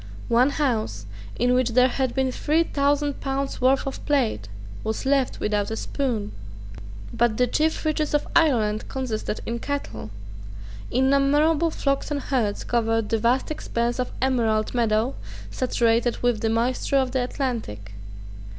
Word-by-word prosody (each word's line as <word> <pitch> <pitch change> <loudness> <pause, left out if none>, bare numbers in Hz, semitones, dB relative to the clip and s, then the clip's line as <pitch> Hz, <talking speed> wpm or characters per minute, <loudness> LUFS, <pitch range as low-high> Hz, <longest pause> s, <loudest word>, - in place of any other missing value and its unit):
One 245 +3 +4
house, 220 - -1 0.3
in 245 +1 +2
which 250 -1 +2
there 250 +1 +6
had 260 -1 -1
been 265 -1 +1
three 310 +5 +1
thousand 285 -1 0
pounds' 275 0 -2
worth 260 +2 +3
of 270 - -5
plate, 235 - +1 0.4
was 220 +4 -3
left 270 -1 +1
without 210 -1 0
a 220 - -3
spoon, 230 -4 -2 0.8
But 235 -2 +1
the 250 - +4
chief 315 +6 0
riches 305 -1 0
of 295 - 0
Ireland 225 -10 +2
consisted 240 -5 -3
in 235 +1 -3
cattle. 115 - -4 0.8
Innumerable 280 +5 +3
flocks 275 -3 -1
and 295 -1 -1
herds 240 -8 -1
covered 225 -2 0
that 225 - +1
vast 245 +6 +1
expanse 240 -5 -2
of 250 - -2
emerald 225 -5 +1
meadow, 230 +1 +1 0.4
saturated 240 -1 +1
with 245 -3 +2
the 225 - +1
moisture 245 +4 +1
of 260 -2 +1
the 260 -1 0
Atlantic. 230 - -4
250 Hz, 145 wpm, -24 LUFS, 225-275 Hz, 0.8 s, there